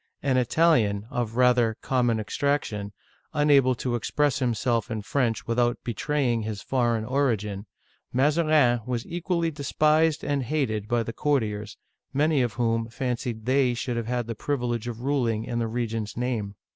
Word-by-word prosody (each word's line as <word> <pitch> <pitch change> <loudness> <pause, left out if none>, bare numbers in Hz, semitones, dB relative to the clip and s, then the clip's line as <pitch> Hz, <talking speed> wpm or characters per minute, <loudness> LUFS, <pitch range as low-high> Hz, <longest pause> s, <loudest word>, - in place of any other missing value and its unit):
An 135 -2 +2
Italian, 120 -7 +2
of 115 -2 -2
rather 125 -3 +3
common 120 -3 +1
extrac 140 +7 0
tion, 100 -1 -5 0.4
unable 140 -4 +4
to 125 0 -3
express 140 +4 0
himself 120 -2 0
in 110 -3 -4
French 120 0 0
without 120 +1 +1
betraying 120 0 0
his 105 -1 -5
foreign 120 -4 0
origin, 110 -6 -1 0.4
Mazarin 145 -3 +3
was 120 -2 -2
equally 170 -1 -1
despised 155 +2 +2
and 145 -1 0
hated 115 -6 -1
by 120 0 +1
the 115 - -6
courtiers, 110 -8 -1 0.4
many 150 0 +2
of 120 -4 0
whom 115 +1 0
fancied 120 -3 -3
they 130 -1 +2
should 120 +1 -3
have 115 -1 -3
had 120 -1 -1
the 115 - -4
privilege 120 -2 -2
of 120 -1 -5
ruling 125 -5 0
in 120 0 -3
the 115 - 0
regent's 115 -2 -3
name. 115 -5 -2
120 Hz, 155 wpm, -26 LUFS, 115-140 Hz, 0.4 s, unable